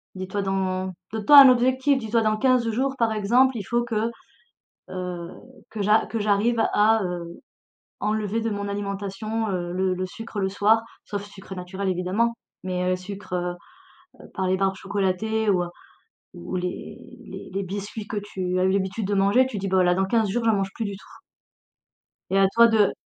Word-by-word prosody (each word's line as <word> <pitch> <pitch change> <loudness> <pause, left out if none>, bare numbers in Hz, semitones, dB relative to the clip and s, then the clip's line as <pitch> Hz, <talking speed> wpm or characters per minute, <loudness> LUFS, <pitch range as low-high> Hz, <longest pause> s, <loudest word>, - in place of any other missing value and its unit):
Dis-toi, 185 +2 -3
dans 190 -1 -1 0.2
donne 220 -2 -4
toi 290 +4 +10
un 270 -2 +10
objectif, 260 +3 +3
dis-toi 225 -1 0
dans 215 0 +2
15 255 -2 +2
jours 265 +4 -1
par 225 -1 +2
exemple, 240 +5 +3
il 205 - -4
faut 235 +5 0
que, 230 0 -1 0.8
heu, 180 -2 -5 0.4
que 215 - -5
j'a 210 +2 +3
que 230 - -3
j'arrive 210 +3 +2
à, 220 +2 +4
heu, 175 -2 -5 0.6
enlever 215 +1 -1
de 225 - -1
mon 200 -1 -3
alimentation, 200 +2 -3
heu, 175 -2 -3
le 185 0 0
le 185 +1 -3
sucre 225 +3 -8
le 190 - +1
soir, 215 +3 +3 0.2
sauf 205 -1 -4
sucre 195 -1 -11
naturel 190 +2 -4
évidemment, 190 +6 0 0.3
mais, 180 0 -1
heu, 185 - +1
sucre, 180 -2 -5 0.8
par 190 -2 -1
les 185 - +2
barres 195 0 +1
chocolatées 205 +3 -1
ou, 180 -2 +2
heu, - - -7 0.7
ou 85 - -6
les 180 0 -4 0.3
les - - -9
les 195 +1 -1
biscuits 205 +3 -6
que 215 - -4
tu 185 -2 -2
as - - +2
eu 190 - +3
l'habitude 195 +1 -1
de 205 - 0
manger, 200 +7 +4
tu 230 -5 -6
dis: 195 - -3
«Bah 185 -1 +3
là, 175 0 +3
dans 190 - +1
15 220 +1 +1
jours, 230 +3 -1
j'en 225 - +4
mange 195 -1 -1
plus 225 - -3
du 200 -1 -4
tout» - - -17 1.3
et 195 - +2
à 195 - +6
toi 235 0 +7
de 215 -3 +3
200 Hz, 190 wpm, -24 LUFS, 185-225 Hz, 1.3 s, toi